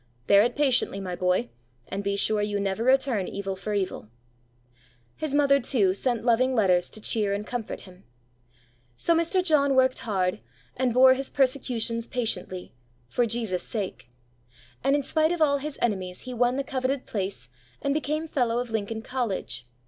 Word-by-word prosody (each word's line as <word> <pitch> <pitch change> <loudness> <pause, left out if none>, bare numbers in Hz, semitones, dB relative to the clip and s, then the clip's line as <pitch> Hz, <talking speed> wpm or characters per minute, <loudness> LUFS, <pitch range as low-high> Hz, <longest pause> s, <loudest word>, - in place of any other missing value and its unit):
Bear 200 +6 +6
it 240 +2 +1
patiently, 260 -8 +1
my 185 -2 -4
boy, 180 -8 +1 0.4
and 200 +1 -4
be 200 0 0
sure 210 +1 +2
you 205 0 -1
never 200 +2 -1
return 260 -6 +2
evil 195 -1 -4
for 195 +3 -5
evil." 185 - -3 1.1
His 305 -2 -3
mother, 280 -1 +4
too, 220 -7 +2
sent 240 +3 -1
loving 255 +2 +3
letters 185 -5 +3
to - - -9
cheer 210 -2 0
and 205 +1 -4
comfort 240 -2 -5
him. 185 0 -15 0.9
So 335 - +2
Mr. 335 +3 +1
John 280 -5 +3
worked 260 0 +3
hard, 185 -5 -1 0.4
and 255 -1 +1
bore 260 +2 +7
his 270 +1 -3
persecutions 245 -4 0
patiently 185 -7 -4 0.4
for 240 -1 +1
Jesus' 220 -5 -1
sake; 185 - -5 0.7
and 275 - +3
in 290 - 0
spite 315 +3 +2
of 350 - -1
all 285 -3 +3
his 295 +1 -5
enemies 185 -5 -1
he 255 - -7
won 245 +1 +2
the 275 - 0
coveted 265 0 -2
place, 190 - -4 0.3
and 280 - 0
became 305 +1 -1
Fellow 245 -7 0
of 245 -1 -3
Lincoln 220 0 -3
College. 225 - -3
235 Hz, 170 wpm, -26 LUFS, 200-265 Hz, 1.1 s, bore